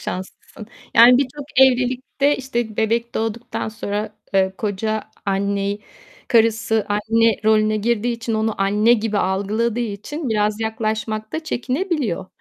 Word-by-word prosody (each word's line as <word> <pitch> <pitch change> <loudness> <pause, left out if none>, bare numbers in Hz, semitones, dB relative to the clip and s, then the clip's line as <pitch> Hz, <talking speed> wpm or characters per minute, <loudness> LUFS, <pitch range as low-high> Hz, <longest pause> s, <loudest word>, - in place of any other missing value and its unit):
şanslısın. 190 +3 -7 0.3
Yani, 245 +2 +8
birçok 280 +1 -3 0.2
evlilikte, 260 +2 +2
işte, 240 -5 -3
bebek 230 +2 0
doğduktan 225 +1 -3
sonra, 210 0 -4 0.2
eee, 190 -1 +3
koca 215 +1 -2 0.2
anneyi, 200 +1 -1 0.5
karısı 225 -2 +2
anne 225 +1 +2
rolüne 215 0 +3
girdiği 235 +2 0
için 230 -1 -3
onu 220 0 0
anne 210 +4 +3
gibi 215 -2 0
algıladığı 210 +5 0
için 240 +7 -4
biraz 210 0 0
yaklaşmak 220 -1 -3
da 320 0 -4
çekinebiliyor. 270 - -2
220 Hz, 120 wpm, -21 LUFS, 210-240 Hz, 0.5 s, Yani